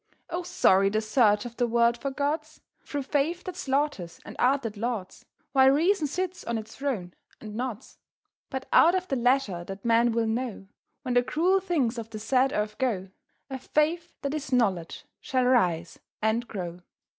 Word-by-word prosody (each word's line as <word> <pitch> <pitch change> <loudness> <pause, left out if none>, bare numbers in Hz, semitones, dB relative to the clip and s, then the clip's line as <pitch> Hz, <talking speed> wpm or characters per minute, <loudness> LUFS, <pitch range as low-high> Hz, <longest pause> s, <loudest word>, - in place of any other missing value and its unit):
Oh, 350 - -1
sorry 195 - +3
the 215 +2 +1
search 215 -1 +3
of 235 -1 -8
the 245 - +2
world 235 0 +3
for 260 +4 -4
gods, 300 +3 -2 0.2
Through 285 -1 -4
faith 295 +6 0
that 370 - -6
slaughters 270 - -2
and - - -9
art 265 +2 +3
that 225 -2 -4
lauds, 220 -3 -4 0.3
While 265 -1 +6
reason 320 +4 +3
sits 365 +5 -3
on 235 -1 -2
its 220 0 -8
throne 225 -11 -3 0.3
and 215 -2 -9
nods. 245 +1 -5 0.5
But 265 -1 -4
out 340 +3 +6
of 370 0 -1
the 270 - +1
leisure 245 -8 +1
that 195 +3 -9
men 235 +1 +4
will 230 0 +1
know, 225 -2 -3 0.4
When 250 - -2
the 245 - +5
cruel 350 +9 +2
things 290 -11 0
of 225 -1 -7
the 220 - -7
sad 255 +5 +2
earth 210 -3 -2
go, 205 -8 -1 0.4
A 265 - -4
Faith 325 +6 0
that 280 0 -1
is 300 -3 -4
Knowledge 195 -9 0 0.2
shall 255 -1 0
rise 175 -10 +2 0.2
and 220 +2 0
grow. 175 -4 -5
245 Hz, 180 wpm, -27 LUFS, 215-285 Hz, 0.5 s, While